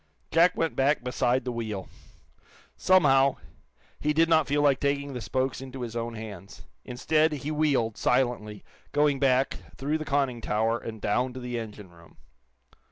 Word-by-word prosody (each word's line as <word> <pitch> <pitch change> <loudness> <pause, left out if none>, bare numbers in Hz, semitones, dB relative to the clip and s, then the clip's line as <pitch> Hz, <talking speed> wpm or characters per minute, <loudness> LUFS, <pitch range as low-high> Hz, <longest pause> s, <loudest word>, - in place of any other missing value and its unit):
Jack 175 +2 +4
went 165 -1 0
back 135 0 +2
beside 125 0 0
the 125 - -2
wheel. 110 -5 -4 0.9
Somehow, 140 -7 +4 0.6
he 150 0 0
did 165 +2 +4
not 160 -4 +4
feel 145 +2 +1
like 140 -2 +3
taking 140 0 -1
the 125 - -5
spokes 130 +2 -2
into 130 -1 -8
his 115 -1 -6
own 115 0 -3
hands. 100 -3 -9 0.2
Instead, 155 +6 +1
he 145 +1 -4
wheeled, 140 -8 +1
silently, 120 -5 0 0.3
going 145 -1 +2
back, 130 -1 +2 0.2
through 150 +4 -1
the - - -3
conning 140 -5 -1
tower, 115 +2 0
and 110 -2 -8
down 125 +5 0
to 130 - -7
the 125 -1 -4
engine 105 -4 -9
room. 85 -1 -19
130 Hz, 165 wpm, -27 LUFS, 115-145 Hz, 0.9 s, Jack